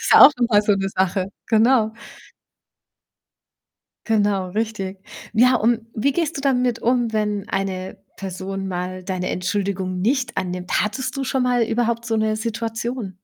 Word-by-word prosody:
Ist - - -2
ja - - +9
auch - - +11
nochmal 230 -4 +3
so 210 - +3
‘ne 195 0 -1
Sache, 190 0 0 0.2
genau. 225 0 +4 2.2
Genau, 205 -4 +1
richtig. 200 -1 -3 0.3
Ja, 250 +3 +5
und 230 0 +2
wie 275 +6 +1
gehst 330 +1 -1
du - - -3
damit 250 -4 +1
um, 240 -1 +1
wenn 210 -2 -1
eine 190 0 -3 0.2
Person 195 0 -5
mal 185 0 -4
deine 185 -1 -2
Entschuldigung 185 -1 -2
nicht 250 +4 0
annimmt? 180 0 -1
Hattest 255 +5 -3
du 275 - -2
schon 260 0 0
mal 245 -1 +2
überhaupt 235 +1 0
so 225 -1 -1
‘ne 215 0 +1
Situation? 230 -1 -4
215 Hz, 150 wpm, -22 LUFS, 190-240 Hz, 2.2 s, auch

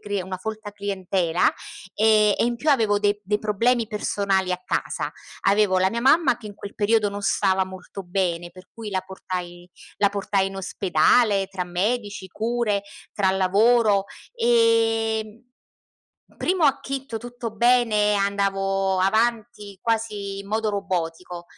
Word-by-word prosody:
crie 205 -2 -3
una 185 +1 -5
folta 215 +2 -6
clientela, 190 -4 -1 0.5
ehm, 215 -1 +4
e - - +1
in 240 0 -1
più 300 +6 +1
avevo 220 -7 +3
dei 205 0 0
dei 210 +2 0
problemi 230 +3 +1
personali 200 -3 -1
a 180 - -3
casa. - - -2 0.3
Avevo 200 -2 +3
la 185 - +3
mia 230 +4 -3
mamma 270 +1 +4
che 215 - -10
in 205 - -10
quel 200 0 -9
periodo 215 0 +2
non 205 0 -6
stava 190 -1 +2
molto 190 +1 -9
bene, 175 -2 -2
per 185 0 -16
cui 220 -2 -7
la 190 - -1
portai 180 -2 -7 0.3
la 205 - +4
portai 195 -1 0
in 195 - -9
ospedale 195 +3 +2
tra 190 -2 -4
medici, 205 +3 -2
cure, 220 -1 -1 0.3
tra 195 -2 +1
lavoro, 200 +2 +3 0.3
e, 225 -1 +2
mhmm, 215 +3 -16 0.9
primo 365 -3 +1
acchito 275 -3 -1
tutto 240 -1 -7
bene, 225 -3 +3
andavo 195 -1 0
avanti 220 0 0
quasi 215 -3 -2
in 200 - -11
modo 215 +1 0
robotico. 180 -3 -4
205 Hz, 145 wpm, -23 LUFS, 190-225 Hz, 0.9 s, ehm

